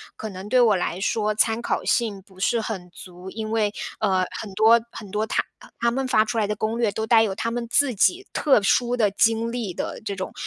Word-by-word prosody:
可 220 - -6
能 195 +2 -8
对 255 0 +4
我 225 -4 +5
来 180 0 -2
说， 210 +1 0
参 225 +1 +1
考 - - -2
性 215 -5 0
不 190 -2 -19
是 230 +4 +1
很 190 -5 -5
足。 180 +2 -11
因 215 +1 -5
为， 215 -2 +1 0.3
呃， 190 -3 +1 0.2
很 210 -3 -8
多 225 +2 +5
很 205 -4 -10
多 215 +1 -1
他 - - 0 0.4
他 235 0 +2
们 265 +1 -2
发 215 -4 +3
出 225 +1 -3
来 210 - +1
的 210 - -2
攻 215 +2 -2
略， 220 -4 +2
都 220 +1 -3
带 225 0 +5
有 195 -3 -2
他 230 - -2
们 235 0 -3
自 280 -2 +3
己 355 - +2
特 270 -8 +3
殊 245 +4 +2
的 210 -4 +2
经 225 +2 +2
历 235 -6 -3
的 - - -5
这 200 -2 -4
种 185 - -5
220 Hz, 250 characters per minute, -23 LUFS, 200-235 Hz, 0.4 s, 我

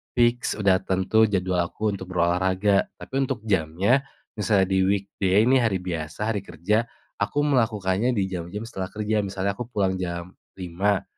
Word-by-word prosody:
fix, 120 0 +2
udah 95 -3 +3
tentu 95 +4 +2
jadwal 90 -3 0
aku 105 +4 -2
untuk 95 - -8
berolahraga. 95 +3 +2
Tapi - - -13
untuk 110 - -4
jamnya, 100 - +1 0.3
misalnya 95 -2 +2
di 95 - +3
weekday 100 0 +1
ini 130 +2 +4
hari 95 -6 0
biasa, 85 +5 -3
hari 105 - -1
kerja, 100 +5 -1 0.3
aku 145 +8 0
melakukannya 115 -4 +1
di 100 - +1
jam-jam 90 +4 -5
setelah 95 -5 -5
kerja, 105 +1 -1
misalnya 100 0 -1
aku 110 +4 -6
pulang 95 -6 0
jam 85 0 -4 0.2
5:00, 95 +2 -1
100 Hz, 155 wpm, -24 LUFS, 95-110 Hz, 0.3 s, ini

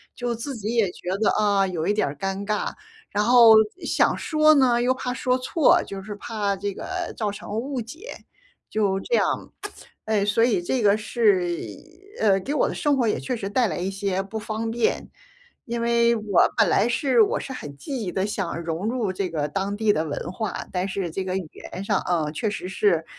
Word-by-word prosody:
就 245 -1 -2
自 265 +5 -5
己 215 +2 -3
也 210 -6 +2
觉 180 - -8
得 220 - +4
啊， 200 -2 +2
有 170 -3 -3
一 205 - +3
点 210 - +1
儿 140 - -4
尴 195 +1 -3
尬， 210 0 -1 0.4
然 210 0 +1
后 235 -1 +8 0.3
想 - - +2
说 310 -1 +4
呢， 245 -4 +4
又 250 +1 +3
怕 250 -1 -4
说 255 0 0
错， 265 +4 +3
就 195 -1 -7
是 210 - -6
怕 205 -2 -2
这 200 0 -3
个 365 - -5
造 210 -4 -1
成 205 - -9
误 265 0 -3
解。 315 - -9 0.5
就 200 -3 0
这 485 - 0
样， - - +3 0.8
呃， 215 -2 +1
所 210 +2 +2
以 220 -7 +2
这 255 +8 -1
个 205 -1 +5
是， 210 -4 +2 0.7
呃， 195 -3 +3
给 280 +9 -3
我 - - +2
的 - - -4
生 290 -1 +1
活 245 -3 +1
也 - - 0
确 255 - -3
实 205 - -5
带 240 +1 +2
来 160 - -3
一 185 +2 -2
些 195 -1 -2
不 200 +3 -6
方 220 +1 -3
便。 235 0 -1 0.6
因 235 -1 -3
为 235 0 +3
我 220 - -5 0.3
本 220 - +5
来 230 - +3
是 265 - +2
我 440 +3 +3
是 270 - -6
很 145 - -8
积 265 - -5
极 195 -5 -3
地， 190 +2 -1
想 195 -5 -3
融 165 +5 -3
入 230 -5 -1
这 190 0 -2
个 150 -3 -1
当 195 +5 -2
地 215 -1 +3
的 155 - 0
文 155 +3 -4
化。 215 0 -4
但 185 +1 -1
是 190 -3 -3
这 190 +4 -3
个 185 - -1
语 180 -5 -4 0.2
言 190 +2 -5
上 200 -2 +1
啊， 165 -4 0
确 210 +8 -2
实 205 - -5
是， 185 -4 +1
210 Hz, 230 characters per minute, -24 LUFS, 195-240 Hz, 0.8 s, 后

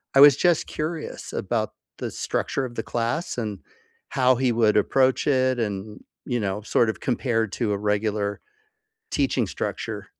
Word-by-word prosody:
I - - +7
was 145 -2 +9
just 175 0 +2
curious 155 +1 -5
about - - -1 0.3
the - - -3
structure 135 - -2
of 120 -2 -8
the 115 - -2
class, 120 +8 -2
and 105 -5 -3 0.5
how 130 -1 +4
he 125 0 +1
would 115 -2 +3
approach 130 +6 +3
it 130 -3 +2
and, 105 -1 -4 0.2
you 120 -1 -1
know, 100 -1 -2
sort 115 +1 +2
of 110 - -3
compared 115 -4 0
to 115 -4 -1
a - - 0
regular 105 0 0 0.7
teaching - - +1
structure. - - -4
120 Hz, 160 wpm, -24 LUFS, 105-130 Hz, 0.7 s, was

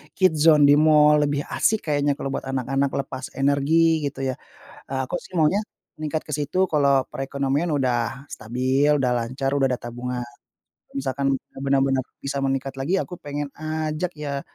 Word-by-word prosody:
Kids 180 -5 +3
Zone 150 -2 +7
di 145 - +7
mall, 150 -1 +5
lebih 145 0 -1
asik 215 -8 +1
kayaknya 145 -1 +1
kalau 135 - -4
buat 135 - -4
anak-anak 135 +1 0 0.2
lepas 130 0 -6
energi, 155 +4 +3
gitu 135 -1 -6
ya. 130 - 0 0.6
Eee, 135 - -1
aku - - -3
sih - - -16
maunya, 155 +5 +3 0.4
meningkat 155 0 -3
ke 150 - -2
situ 150 +6 0
kalau 140 -5 +2
perekonomian 140 +4 -2
udah 130 -1 -1
stabil, 130 +6 0
udah 125 -2 +1
lancar, 130 +3 -2
udah 135 -1 +3
ada 125 - -1
tabungan. 120 +1 -5 0.7
Misalkan 135 0 -1 0.3
benar-benar 135 -1 +2 0.2
bisa 140 0 -3
meningkat 135 0 -1
lagi 140 +8 0
aku 180 - -4
pengen 145 0 -4
ajak 155 +2 -3
ya, 140 -2 -3
140 Hz, 160 wpm, -23 LUFS, 135-150 Hz, 0.7 s, Zone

